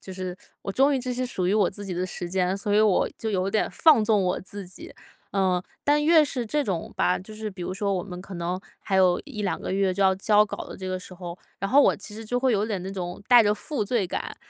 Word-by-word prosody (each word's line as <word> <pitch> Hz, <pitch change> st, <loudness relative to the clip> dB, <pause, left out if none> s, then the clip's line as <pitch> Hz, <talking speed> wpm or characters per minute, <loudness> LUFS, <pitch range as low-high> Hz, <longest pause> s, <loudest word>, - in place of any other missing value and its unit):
就 190 Hz, -, -10 dB
是， 185 Hz, -1 st, -5 dB, 0.3 s
我 195 Hz, -, -4 dB
终 275 Hz, +5 st, +4 dB
于 -, -, +1 dB
就 250 Hz, 0 st, -3 dB
是 255 Hz, +1 st, -2 dB
属 185 Hz, -7 st, -2 dB
于 190 Hz, -, +2 dB
我 210 Hz, -3 st, +3 dB
自 205 Hz, +1 st, -8 dB
己 190 Hz, -, -5 dB
的 180 Hz, +1 st, -2 dB
时 175 Hz, -1 st, -5 dB
间， 185 Hz, 0 st, +1 dB
所 205 Hz, +1 st, -2 dB
以 210 Hz, -, +5 dB
我 210 Hz, -4 st, +3 dB
就 225 Hz, -, -3 dB
有 190 Hz, -1 st, 0 dB
点 215 Hz, -, +1 dB
放 300 Hz, -9 st, +5 dB
纵 210 Hz, -2 st, +3 dB
我 180 Hz, -, 0 dB
自 195 Hz, 0 st, -8 dB
己。 180 Hz, -, -10 dB, 0.4 s
呃， 185 Hz, -2 st, +1 dB, 0.2 s
但 295 Hz, +1 st, +3 dB
越 320 Hz, -1 st, +6 dB
是 250 Hz, -4 st, -3 dB
这 295 Hz, +6 st, 0 dB
种 180 Hz, -7 st, -3 dB
吧， 180 Hz, -, +2 dB
就 190 Hz, +4 st, -11 dB
是 215 Hz, 0 st, -4 dB
比 185 Hz, -2 st, -12 dB
如 185 Hz, -, -3 dB
说 200 Hz, 0 st, -1 dB
我 180 Hz, -, -1 dB
们 180 Hz, -2 st, -8 dB
可 195 Hz, 0 st, -9 dB
能， 175 Hz, +2 st, -2 dB, 0.2 s
还 190 Hz, -, -1 dB
有 185 Hz, -2 st, +4 dB
1-2 210 Hz, -8 st, -3 dB
个 -, -, -5 dB
月 190 Hz, -1 st, +1 dB
就 200 Hz, -, +1 dB
要 190 Hz, 0 st, +5 dB
交 210 Hz, +1 st, +4 dB
稿 -, -, -6 dB
的 -, -, -9 dB
这 185 Hz, 0 st, -6 dB
个 185 Hz, 0 st, -2 dB
时 185 Hz, -, -11 dB
候， 175 Hz, -1 st, -8 dB, 0.2 s
然 195 Hz, -, -2 dB
后 280 Hz, +2 st, +7 dB
我 -, -, +4 dB
其 210 Hz, -, -10 dB
实 225 Hz, +1 st, -7 dB
就 245 Hz, +3 st, -1 dB
会 260 Hz, -2 st, +3 dB
有 205 Hz, 0 st, +1 dB
点 200 Hz, -5 st, -3 dB
那 190 Hz, -, -5 dB
种 180 Hz, 0 st, -5 dB
带 245 Hz, -1 st, +8 dB
着 210 Hz, -2 st, +3 dB
负 245 Hz, -1 st, -3 dB
罪 230 Hz, -1 st, 0 dB
感， -, -, -4 dB
195 Hz, 295 characters per minute, -25 LUFS, 185-220 Hz, 0.4 s, 带